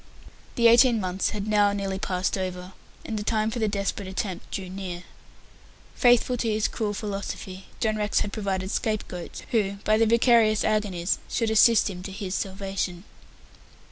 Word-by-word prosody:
The 235 - +1
eighteen 235 0 +6
months 185 -1 -1
had 205 -1 -4
now 205 -1 +3
nearly 195 -1 -3
passed 185 -1 -1
over, 185 -1 -5 0.3
and 220 -1 -3
the - - -4
time 220 0 0
for 240 - -4
the 220 - +1
desperate 200 -1 -2
attempt 190 -1 -4
drew 190 -2 -5
near. 180 -1 -6 0.9
Faithful 245 0 +3
to 230 -1 -1
his 215 0 +1
cruel 210 -3 -3
philosophy, 195 -2 -5
John 215 -1 0
Rex 210 -1 +1
had 205 - -3
provided 195 -3 -2
scape 215 -3 -1
goats, 175 -2 -8
who, 205 -4 +1
by 215 0 +3
their 225 - +4
vicarious 230 -2 +4
agonies, 200 -5 0
should 225 -2 0
assist 220 0 +5
him 185 -3 -6
to 190 - -7
his 190 -1 -5
salvation. 195 -2 -3
205 Hz, 170 wpm, -26 LUFS, 190-220 Hz, 0.9 s, eighteen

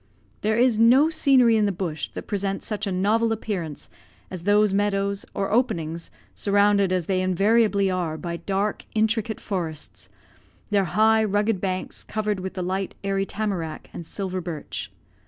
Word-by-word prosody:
There 215 +1 +1
is 240 -2 +3
no 260 +8 +6
scenery 260 -7 +4
in 210 -1 +3
the - - +1
bush 170 -4 -3
that - - -6
presents 195 -1 -2
such 210 -1 -3
a - - -1
novel 215 +5 +2
appearance 190 -9 -4 0.4
as 180 -2 -7
those 205 0 +4
meadows, 200 0 0
or 195 -1 -1
openings, 170 -9 0 0.2
surrounded 200 -1 +3
as 180 -3 0
they 185 0 0
invariably 200 +2 +2
are, 170 -4 -2
by 170 +1 -4
dark, 200 +3 -2
intricate 220 0 +1
forests; 165 -6 -5 0.6
their 200 -2 +3
high, 220 +5 +3
rugged 205 -1 +1
banks 185 -1 -3
covered 210 -2 -2
with 190 +1 -6
the 185 - -2
light, 190 +1 -2
airy 195 0 0
tamarack 190 -7 -4
and 165 - -8
silver 185 -2 -4
birch. 150 - -5
200 Hz, 155 wpm, -24 LUFS, 185-215 Hz, 0.6 s, no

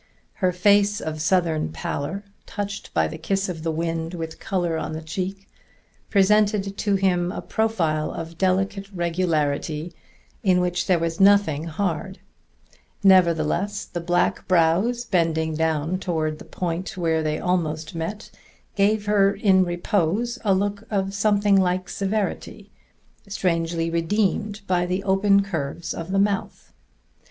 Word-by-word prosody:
Her 185 -1 +3
face 205 +3 +3
of 155 -4 -4
Southern 165 - +1
pallor, 145 - -4 0.2
touched 205 -1 -5
by - - +2
the 160 - -7
kiss 195 +4 -1
of 165 -3 -5
the 165 0 -1
wind 165 +1 -3
with 160 -1 -6
color 175 -4 -1
on 160 0 -3
the 160 - -5
cheek, 190 +4 -5 0.6
presented 205 0 +3
to 200 -1 0
him 180 -2 +1
a - - -5
profile 165 -9 0
of 165 0 -7
delicate 195 +1 0
regularity 165 -3 -1 0.5
in 185 -2 +3
which 180 0 -1
there 180 - +4
was 165 0 -2
nothing 195 -6 +4
hard; 170 +1 -3 0.9
nevertheless 185 +2 +3
the 175 - -5
black 175 +1 0
brows 185 +8 +2
bending 165 -5 +1
down 160 +2 0
toward 155 -4 -2
the - - -11
point 180 +1 -4
where 165 -2 +1
they 155 0 -1
almost 160 -3 -1
met 175 +6 -5 0.4
gave 205 +1 +2
her 200 -1 +4
in 195 -2 +3
repose 195 +6 -1
a 200 -3 +3
look 200 +2 -1
of 195 -2 -1
something 205 -1 +3
like 185 0 0
severity, 200 +2 -3 0.6
strangely 170 -4 -1
redeemed 205 +4 0
by 180 -2 +1
the 185 +2 -2
open 200 +1 +3
curves 165 -3 -4
of 165 +1 -6
the 195 - +1
mouth. 200 0 -1
180 Hz, 140 wpm, -23 LUFS, 165-200 Hz, 0.9 s, there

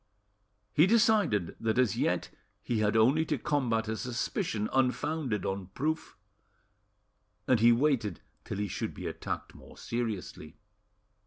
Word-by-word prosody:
He 155 +5 +5
decided 210 - +3
that 110 +1 0
as 125 -5 +3
yet - - 0 0.3
he 115 -3 -1
had 105 +1 +2
only 130 +8 +4
to 150 -2 -1
combat 120 -5 0
a 110 - -1
suspicion 115 - -2
unfounded 130 - 0
on 95 -1 -3
proof, 155 +3 -2 1.3
and 125 - +4
he 115 +2 +6
waited 120 -4 +1 0.2
till - - -5
he 105 0 -1
should - - -4
be - - -7
attacked - - -5
more - - -15
seriously. 110 -8 -4
120 Hz, 135 wpm, -30 LUFS, 110-150 Hz, 1.3 s, he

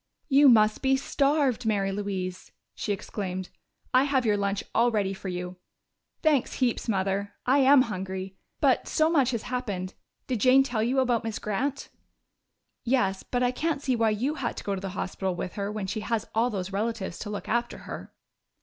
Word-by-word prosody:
"You 280 0 +7
must 215 -3 +4
be 270 0 +3
starved, 275 -2 +1
Mary 200 -3 +1
Louise!" 190 -2 -4 0.2
she 210 - -3
exclaimed. 190 -2 -4 0.4
"I 255 +2 +5
have 270 -3 +1
your 210 -2 +3
lunch 200 0 -1
all 235 +2 +4
ready 205 -4 0
for 190 0 -8
you." 180 0 -4 0.7
"Thanks 300 -6 +2
heaps, 245 -2 0
Mother 195 0 -1
I 270 +3 +4
am 270 0 +7
hungry. 190 -3 -5 0.3
But - - +3
so 315 0 +2
much 275 -7 +3
has 235 -4 -2
happened. 205 -8 -3 0.3
Did 250 -4 -2
Jane 260 +3 +6
tell 245 -5 -2
you 255 +4 +2
about 245 -3 +1
Miss 225 -1 -3
Grant?" 265 +7 -2 0.9
"Yes. 200 -7 +1
But 245 0 -1
I 245 - +3
can't 300 +1 -2
see 260 -3 +1
why 225 -1 +2
you 235 +8 0
had 270 -6 -3
to - - -6
go 200 - -1
to 190 - -4
the 195 - -4
hospital 190 -1 -2
with 175 +1 -4
her 200 0 -3
when 210 -2 -3
she 215 +4 -3
has 220 +1 -2
all 230 +3 +2
those 195 -3 -4
relatives 205 -3 -2
to 210 - -5
look 205 - -5
after 240 +1 -1
her." - - -7
220 Hz, 190 wpm, -27 LUFS, 195-255 Hz, 0.9 s, You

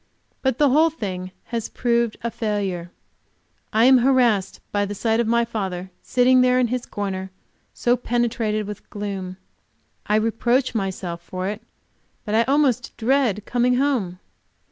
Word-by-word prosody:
But 265 -3 0
the 290 -2 +4
whole 315 +4 +5
thing 185 - -5
has 230 -2 -4
proved 235 -2 0
a 235 - -1
failure. 200 -6 -2 0.8
I 220 +2 +4
am 260 0 +7
harassed 240 -6 +2
by 205 0 +1
the 205 0 -4
sight 225 +2 +1
of 235 - +1
my 235 +1 +2
father, 190 -5 -4
sitting 255 0 +4
there 250 0 +4
in 245 -2 +2
his 250 0 -3
corner 190 -2 -4 0.4
so 240 0 +1
penetrated 230 -3 -1
with 205 0 -9
gloom; 195 -3 -5 0.7
I 210 - +2
reproach 235 +4 +1
myself 190 -5 -3
for 185 +2 -5
it, 210 +2 -5 0.6
but 210 - -3
I 225 - +5
almost 265 -3 +1
dread 235 -4 +1
coming 245 +1 +2
home. 250 -10 0
225 Hz, 150 wpm, -22 LUFS, 200-250 Hz, 0.8 s, am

